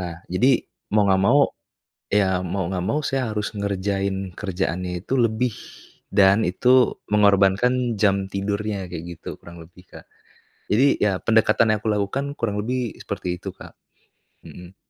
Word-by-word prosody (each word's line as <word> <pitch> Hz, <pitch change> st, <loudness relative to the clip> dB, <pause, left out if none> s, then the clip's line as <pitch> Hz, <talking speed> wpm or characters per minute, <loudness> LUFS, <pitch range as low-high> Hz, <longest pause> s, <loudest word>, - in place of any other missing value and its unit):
Nah, 85 Hz, -1 st, -7 dB
jadi 125 Hz, +8 st, +3 dB, 0.3 s
mau 105 Hz, -1 st, +4 dB
nggak 95 Hz, 0 st, +3 dB
mau, 140 Hz, +3 st, +5 dB, 0.7 s
ya 95 Hz, -3 st, +2 dB
mau 90 Hz, -1 st, -2 dB
nggak 90 Hz, -1 st, -3 dB
mau 150 Hz, +9 st, 0 dB
saya 130 Hz, -6 st, -2 dB
harus 105 Hz, 0 st, -2 dB
ngerjain 95 Hz, -1 st, -2 dB
kerjaannya 90 Hz, -2 st, -3 dB
itu 120 Hz, -, -5 dB
lebih, 115 Hz, 0 st, +1 dB, 0.6 s
dan 100 Hz, +2 st, +5 dB
itu 125 Hz, +8 st, +3 dB
mengorbankan 105 Hz, +4 st, +3 dB
jam 100 Hz, -2 st, +1 dB
tidurnya, 100 Hz, 0 st, -3 dB
kayak 85 Hz, -1 st, -6 dB
gitu -, -, -9 dB
kurang 85 Hz, 0 st, -12 dB
lebih, 90 Hz, +2 st, -18 dB
Kak. -, -, -13 dB, 0.6 s
Jadi, 130 Hz, +7 st, +3 dB
ya 100 Hz, -3 st, +2 dB
pendekatan 110 Hz, 0 st, +3 dB
yang 105 Hz, -, -1 dB
aku 110 Hz, -, -2 dB
lakukan, 105 Hz, +7 st, -1 dB
kurang 105 Hz, -3 st, -1 dB
lebih 125 Hz, 0 st, -2 dB
seperti 90 Hz, 0 st, -4 dB
itu, 95 Hz, -, -5 dB
Kak. -, -, -13 dB, 0.7 s
Mhm. 90 Hz, +1 st, -12 dB
100 Hz, 150 wpm, -23 LUFS, 95-110 Hz, 0.7 s, mau